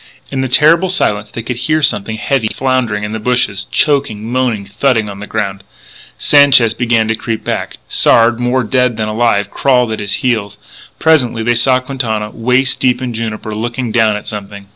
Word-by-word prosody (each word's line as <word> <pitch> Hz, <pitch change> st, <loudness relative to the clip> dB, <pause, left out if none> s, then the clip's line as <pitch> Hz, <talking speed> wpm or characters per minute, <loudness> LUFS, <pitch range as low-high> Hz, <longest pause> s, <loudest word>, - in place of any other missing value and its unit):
In 135 Hz, -1 st, -2 dB
the 130 Hz, -, -1 dB
terrible 160 Hz, +8 st, +4 dB
silence 105 Hz, -, 0 dB
they 115 Hz, -, -6 dB
could 120 Hz, +1 st, -4 dB
hear 155 Hz, +4 st, 0 dB
something 110 Hz, -3 st, 0 dB
heavy 120 Hz, 0 st, 0 dB
floundering 125 Hz, -4 st, -1 dB
in 105 Hz, -, -4 dB
the 110 Hz, -, -4 dB
bushes, 105 Hz, -4 st, -1 dB
choking, 135 Hz, -8 st, 0 dB
moaning, 125 Hz, -5 st, -1 dB
thudding 110 Hz, +2 st, 0 dB
on 100 Hz, -1 st, -8 dB
the 105 Hz, -, -8 dB
ground. 100 Hz, -3 st, -3 dB, 0.5 s
Sanchez 140 Hz, -6 st, +5 dB
began 115 Hz, -2 st, +1 dB
to 110 Hz, -, +1 dB
creep 115 Hz, 0 st, -4 dB
back; -, -, -4 dB
Sard, 115 Hz, 0 st, +3 dB
more 125 Hz, +1 st, 0 dB
dead 125 Hz, +1 st, 0 dB
than 110 Hz, -1 st, -2 dB
alive, 110 Hz, -2 st, 0 dB
crawled 125 Hz, -4 st, +1 dB
at 110 Hz, -, -3 dB
his 100 Hz, -1 st, -3 dB
heels. 105 Hz, -5 st, -1 dB, 0.4 s
Presently 125 Hz, -8 st, +2 dB
they 120 Hz, +1 st, +2 dB
saw 125 Hz, +2 st, +3 dB
Quintana, 115 Hz, -5 st, -3 dB
waist 125 Hz, +3 st, 0 dB
deep 125 Hz, -1 st, +1 dB
in 125 Hz, -2 st, -4 dB
juniper, 110 Hz, -1 st, -5 dB
looking 120 Hz, +2 st, -3 dB
down 110 Hz, -2 st, +2 dB
at 105 Hz, -, -7 dB
something. 100 Hz, -1 st, -8 dB
115 Hz, 185 wpm, -14 LUFS, 110-130 Hz, 0.5 s, Sanchez